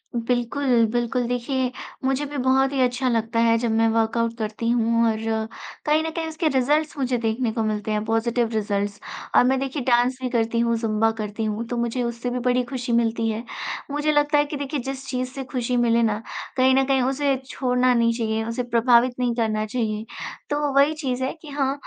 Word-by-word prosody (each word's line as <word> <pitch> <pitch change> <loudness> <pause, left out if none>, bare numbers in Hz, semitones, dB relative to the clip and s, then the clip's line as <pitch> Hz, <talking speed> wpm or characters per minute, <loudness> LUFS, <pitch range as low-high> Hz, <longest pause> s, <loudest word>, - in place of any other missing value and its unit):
बिल्कुल, 240 +1 +1
बिल्कुल, 240 0 0
देखिए, 250 +1 -1 0.3
मुझे 270 +2 +1
भी 290 0 -6
बहुत 265 +1 +3
ही 270 - -1
अच्छा 250 +1 +1
लगता 230 0 0
है, 230 0 +4
जब 230 -1 -1
मैं 225 0 +3
वर्कआउट 230 +1 +1
करती 220 +1 -2
हूँ 230 -1 +2
और 220 - -3 0.7
कहीं 305 +1 +3
न 320 - -2
कहीं 330 -1 -2
उसके 320 0 -1
रिज़ल्ट्स 295 +3 +1
मुझे 255 -2 0
देखने 230 +1 -1
को 225 0 -1
मिलते 215 0 -2
हैं, 210 0 0
पॉज़िटिव 225 +1 +1
रिज़ल्ट्स। 205 -1 -1 0.4
और - - +7
मैं 260 +1 +2
देखिए, 270 0 -3
डांस 245 0 +2
भी 255 - -1
करती 230 -1 0
हूँ, 235 0 +2
ज़ुम्बा 225 0 +1
करती 210 +1 -4
हूँ, 215 +1 -2
तो 245 - -3
मुझे 235 +1 -1
उससे 235 +1 -3
भी 250 +1 -2
बड़ी 250 0 +2
खुशी 250 -1 -3
मिलती 230 -1 +1
है। 220 +1 -3 0.5
मुझे 295 +1 +1
लगता 295 0 +3
है 290 - +4
कि 290 0 -5
देखिए, 285 +1 -3
जिस 270 +1 -6
चीज़ 255 -1 -2
से 270 - -5
खुशी 250 -1 0
मिले 235 -1 +3
ना, 220 -1 0 0.4
कहीं 260 0 +5
न 270 0 +3
कहीं 270 -1 +2
उसे 270 +2 +1
छोड़ना 255 -2 +1
नहीं 230 -1 +3
चाहिए, 225 -1 -1
उसे 230 +2 -2
प्रभावित 240 +1 +3
नहीं 245 -1 +1
करना 215 -2 0
चाहिए। 215 -1 -2 0.4
तो 290 -1 0
वही 280 +2 +5
चीज़ 255 -1 -1
है 260 - -1
कि 305 - -11
हाँ 275 -1 0
245 Hz, 205 wpm, -23 LUFS, 230-265 Hz, 0.7 s, और